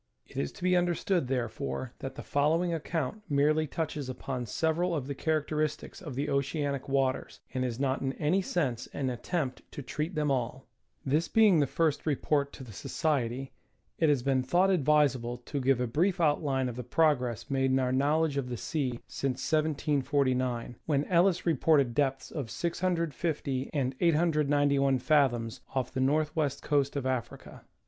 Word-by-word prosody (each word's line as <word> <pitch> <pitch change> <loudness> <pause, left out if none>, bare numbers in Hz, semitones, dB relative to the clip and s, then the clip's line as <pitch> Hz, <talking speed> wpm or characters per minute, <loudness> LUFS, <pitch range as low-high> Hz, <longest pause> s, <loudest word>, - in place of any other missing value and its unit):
It - - -19
is 70 - -1
to - - -12
be 185 0 +3
understood, 175 -2 +1
therefore, 125 0 -3
that 135 - -6
the - - -7
following 165 +5 +1
account 165 +4 -3
merely 150 +2 +2
touches 150 -3 -3
upon 125 -1 -4
several 165 +7 0
of 140 -5 -2
the 140 - -3
characteristics 155 0 -2
of 150 -8 -7
the 140 +3 -1
oceanic 140 0 -1
waters, 135 -1 0
and 130 -1 -1
is 125 -1 -3
not 135 -1 0
in 135 0 -1
any 165 +7 +1
sense 135 -10 -1
an 130 -2 -1
attempt 130 +2 -3
to 145 - -7
treat 155 +7 -3
them 150 -2 +1
all. 130 0 -2 0.4
This 150 +5 +1
being 210 -5 +5
the 145 - +3
first 160 +1 0
report 140 0 +1
to 135 - -9
the 115 -4 -11
Society 135 - -1 0.5
it 160 - +4
has 140 -4 +2
been 135 -1 +2
thought 175 +9 +3
advisable 140 -7 +2
to 140 +3 -5
give 130 -1 +3
a 125 - +1
brief 175 - +1
outline 145 -4 +1
of 120 -1 -5
the 125 - -4
progress 125 -2 +1
made 135 -1 +2
in 130 - +3
our 130 -1 +1
knowledge 145 +3 +2
of 130 -2 -2
the 120 - -3
sea 130 -3 -2
since 130 -2 -3
1749, 135 -5 0
when 145 -2 +1
Ellis 180 0 +3
reported 150 -5 +3
depths 135 0 0
of 140 -8 -4
650 165 -4 -1
and 135 -3 0
891 145 -4 +3
fathoms 125 -5 +1
off 130 -2 -1
the 130 - -1
north 150 +3 +1
west 150 -4 -1
coast 140 -1 +1
of 140 -2 -2
Africa. 130 -3 -4
140 Hz, 170 wpm, -29 LUFS, 130-155 Hz, 0.5 s, being